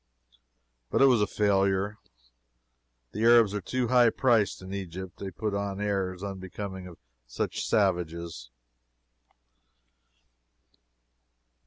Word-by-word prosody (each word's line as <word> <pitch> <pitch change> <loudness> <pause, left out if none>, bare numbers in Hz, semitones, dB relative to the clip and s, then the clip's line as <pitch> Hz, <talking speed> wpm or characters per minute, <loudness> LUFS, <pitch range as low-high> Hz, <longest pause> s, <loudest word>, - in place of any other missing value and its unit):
But - - +3
it - - +8
was 125 -5 +4
a 105 - +2
failure. 100 0 +1 1.1
The 105 - -5
Arabs 115 -3 +5
are 105 - -2
too 125 +5 -2
high 125 -2 +5
priced 115 -3 +2
in 95 +1 -9
Egypt. 95 -1 -7
They 100 - -5
put 105 +3 -4
on 100 -1 -3
airs 95 -2 -2
unbecoming 95 -1 -6
to 90 -2 -11 0.3
such - - -3
savages. 85 - -1
100 Hz, 110 wpm, -28 LUFS, 95-105 Hz, 1.1 s, it